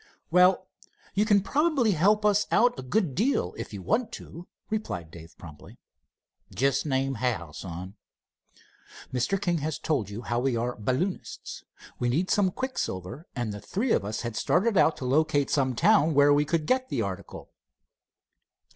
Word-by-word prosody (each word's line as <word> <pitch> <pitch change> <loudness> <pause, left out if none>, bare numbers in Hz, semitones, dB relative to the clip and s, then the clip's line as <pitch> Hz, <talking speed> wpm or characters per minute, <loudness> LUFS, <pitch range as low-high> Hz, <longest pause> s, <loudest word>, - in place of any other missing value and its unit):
"Well, 180 +1 +4 0.5
you 205 +2 +2
can 205 -2 +4
probably 285 -4 +2
help 205 +5 +3
us 205 0 +3
out 245 +1 +3
a - - -3
good 150 +4 0
deal 205 - 0
if - - -7
you 100 -3 -7
want 225 - 0
to," 170 +3 -9 0.2
replied 90 - -3
Dave 80 -1 -13
promptly. 75 -4 -13 0.7
"Just 140 +3 0
name 135 -1 0
how, 115 - -2
son." 90 +5 -8 1.2
"Mr. 130 +11 0
King 175 -4 0
has 155 +1 -3
told 130 - -1
you 105 +4 -7
how 120 0 -1
we 125 -1 0
are 120 +2 -2
balloonists. 130 - -3 0.4
We 120 - 0
need 165 +10 0
some 205 -3 +3
quicksilver, 155 - -4
and 120 -4 -2
the 105 - -8
three 225 +5 -2
of - - +2
us 105 +2 -4
had 115 -2 -5
started 200 - +1
out 165 - +4
to 130 - -6
locate 145 +1 +2
some 130 -3 +1
town 165 - +4
where 145 0 +6
we 145 +1 +3
could 160 0 0
get 255 +4 +1
the 120 -5 -1
article." 95 -2 -7
145 Hz, 165 wpm, -27 LUFS, -, 1.2 s, where